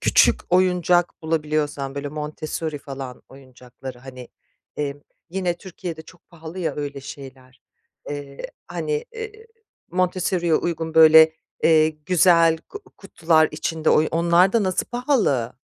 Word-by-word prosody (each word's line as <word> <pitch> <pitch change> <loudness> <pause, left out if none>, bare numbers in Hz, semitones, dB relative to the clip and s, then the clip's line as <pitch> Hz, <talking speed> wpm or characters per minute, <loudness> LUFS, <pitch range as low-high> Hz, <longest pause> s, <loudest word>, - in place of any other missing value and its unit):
küçük - - +4
oyuncak 180 -1 +2
bulabiliyorsan 150 -3 -2
böyle 140 0 -4
Montessori 150 +1 -5
falan, 135 -2 -8
oyuncakları, 130 -1 -12
hani, 125 -1 -11 0.5
emm, 145 -1 -3 0.3
yine, 180 -1 -1
Türkiye'de 175 -3 -8
çok 175 +2 -19
pahalı 165 +1 -10
ya 175 - -2
öyle 145 -1 -5
şeyler, 130 -2 -12 0.5
eee, 145 -1 -7 0.3
hani, 155 -4 -3
ııı, 445 -1 -5 0.6
Montessori'ye 180 -1 0
uygun 165 -1 -2
böyle, 160 0 +8 0.3
eee, 155 -1 +5
güzel 165 +1 +3
ku 415 - -12
kutular 160 -1 +2
içinde, 160 +1 -1
oy 155 - +3
onlar 170 +3 +3
da 230 -2 +2
nasıl 185 -1 -1
pahalı? 235 - 0
160 Hz, 120 wpm, -22 LUFS, 145-175 Hz, 0.6 s, böyle